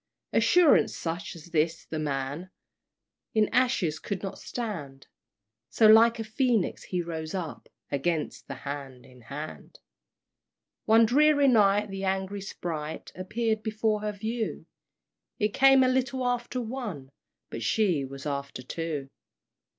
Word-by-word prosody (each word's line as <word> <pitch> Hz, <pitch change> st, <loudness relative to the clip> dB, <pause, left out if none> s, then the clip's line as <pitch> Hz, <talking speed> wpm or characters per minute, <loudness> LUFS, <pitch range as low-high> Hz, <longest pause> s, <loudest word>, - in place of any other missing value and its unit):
Assurance 355 Hz, -4 st, +5 dB
such 175 Hz, +4 st, -4 dB
as 170 Hz, +1 st, -13 dB
this 160 Hz, 0 st, 0 dB
the 160 Hz, -, -4 dB
man 145 Hz, +4 st, -3 dB, 0.9 s
In 215 Hz, -1 st, +4 dB
ashes 225 Hz, -12 st, +1 dB
could 200 Hz, -2 st, -4 dB
not 195 Hz, -, -5 dB
stand; 160 Hz, -, -6 dB, 0.6 s
So 225 Hz, -, +3 dB
like 225 Hz, +2 st, +7 dB
a 225 Hz, -, -3 dB
Phoenix 230 Hz, -2 st, 0 dB
he 180 Hz, -2 st, -2 dB
rose 160 Hz, 0 st, -5 dB
up 170 Hz, -5 st, -5 dB, 0.2 s
Against 150 Hz, +3 st, -2 dB
the 135 Hz, -, -5 dB
Hand 135 Hz, -3 st, -6 dB
in 125 Hz, -1 st, -17 dB
Hand! 140 Hz, +7 st, -8 dB, 1.1 s
One 225 Hz, +1 st, +6 dB
dreary 285 Hz, +4 st, +4 dB
night 210 Hz, -4 st, +4 dB
the 195 Hz, 0 st, -5 dB
angry 190 Hz, +1 st, -1 dB
sprite 160 Hz, -5 st, -5 dB
Appeared 220 Hz, +4 st, -1 dB
before 215 Hz, -1 st, 0 dB
her 210 Hz, 0 st, -2 dB
view; 220 Hz, +3 st, -3 dB, 0.7 s
It 210 Hz, -2 st, +1 dB
came 270 Hz, 0 st, +6 dB
a -, -, +4 dB
little 260 Hz, 0 st, 0 dB
after 245 Hz, 0 st, -1 dB
one, 220 Hz, -, -5 dB, 0.4 s
But 115 Hz, -, -5 dB
she 175 Hz, -, +1 dB
was 135 Hz, +1 st, -8 dB
after 140 Hz, -3 st, -4 dB
two! 155 Hz, -1 st, -4 dB
195 Hz, 135 wpm, -28 LUFS, 150-230 Hz, 1.1 s, like